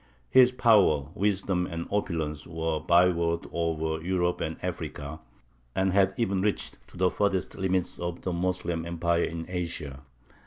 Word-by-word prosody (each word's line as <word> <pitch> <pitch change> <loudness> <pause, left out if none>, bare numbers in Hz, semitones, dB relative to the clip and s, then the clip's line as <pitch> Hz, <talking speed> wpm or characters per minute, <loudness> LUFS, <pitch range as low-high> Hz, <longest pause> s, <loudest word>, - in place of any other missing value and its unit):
His 125 -1 +7
power, 100 - +4
wisdom, 95 -3 0
and 85 -1 -4
opulence, 80 -7 -2
were 80 -1 -2
a - - -3
byword 85 0 +3
over 80 -1 -1
Europe 90 -1 0
and - - -3
Africa, 75 +2 -5 0.6
and 95 0 +2
had 95 -1 +3
even 100 -5 +1
reached 105 +1 -1
to - - -15
the 90 0 +3
furthest 100 -3 0
limits 95 -1 -1
of 85 0 -4
the 90 - -1
Moslem 85 -1 -1
empire 85 0 0
in 80 0 -5
Asia. 85 -6 -4
85 Hz, 150 wpm, -28 LUFS, 80-95 Hz, 0.6 s, His